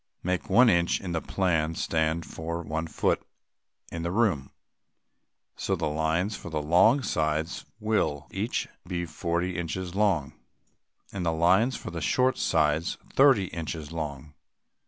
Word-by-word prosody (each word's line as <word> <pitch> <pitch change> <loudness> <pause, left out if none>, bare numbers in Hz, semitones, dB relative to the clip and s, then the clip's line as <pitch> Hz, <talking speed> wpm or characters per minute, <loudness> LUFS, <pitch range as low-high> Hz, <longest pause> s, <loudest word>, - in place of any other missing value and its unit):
Make 90 0 -2
one 125 +1 +6
inch 85 -5 +3
in 90 - -5
the 80 -1 -1
plan 80 -4 0
stand 80 +1 0
for 85 +1 -5
one 80 +1 -3
foot - - 0 0.7
in 85 - -4
the 85 - -2
room. 95 - +1 1.1
So - - -1
the - - -2
lines 80 +7 0
for - - -8
the 80 -2 -2
long 90 - +4
sides 80 -1 -1
will 105 -10 0
each - - -2 0.2
be 85 -1 -2
forty 85 +2 -2
inches 90 +1 -4
long, 95 -8 +1 0.8
and 95 -2 -4
the 85 - +1
lines 95 +10 +3
for - - -7
the 85 -1 -5
short 130 +10 +2
sides 80 0 +1 0.2
thirty 135 -8 +5
inches 80 -2 -5
long. 75 -3 -5
85 Hz, 145 wpm, -27 LUFS, 80-95 Hz, 1.1 s, one